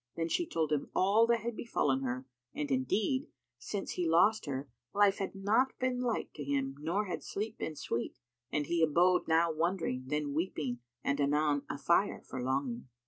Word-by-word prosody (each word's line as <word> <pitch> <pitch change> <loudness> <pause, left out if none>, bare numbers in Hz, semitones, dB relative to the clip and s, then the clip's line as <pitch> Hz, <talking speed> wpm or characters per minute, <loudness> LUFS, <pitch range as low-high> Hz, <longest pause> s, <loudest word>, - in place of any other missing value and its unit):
Then 165 0 -1
she 345 - 0
told 160 - -1
him 150 -2 0
all 205 +5 +4
that 235 -1 +2
had 235 0 -3
befallen 140 - 0
her, 130 0 -3 0.3
and 145 -2 -2
indeed, 210 - +1 0.3
since 200 -2 -4
he 175 -2 -1
lost 190 +4 +4
her, 135 0 -3 0.3
life 205 -1 +4
had 195 0 -3
not 215 +7 +2
been 255 -1 0
light 245 -2 -1
to 145 - -6
him 135 -1 -1
nor 175 +8 0
had 185 - -4
sleep 215 +2 -4
been 155 - -3
sweet, 120 -4 -3 0.3
and 150 -1 0
he 170 +1 0
abode 175 +3 +4
now 165 +1 +4
wondering, 160 -6 -1
then 150 0 -1
weeping 150 -6 -2 0.2
and 140 +1 +1
anon 145 0 +2
afire 170 +7 +1
for 130 - -5
longing. 130 -1 -1
165 Hz, 180 wpm, -32 LUFS, 140-200 Hz, 0.3 s, all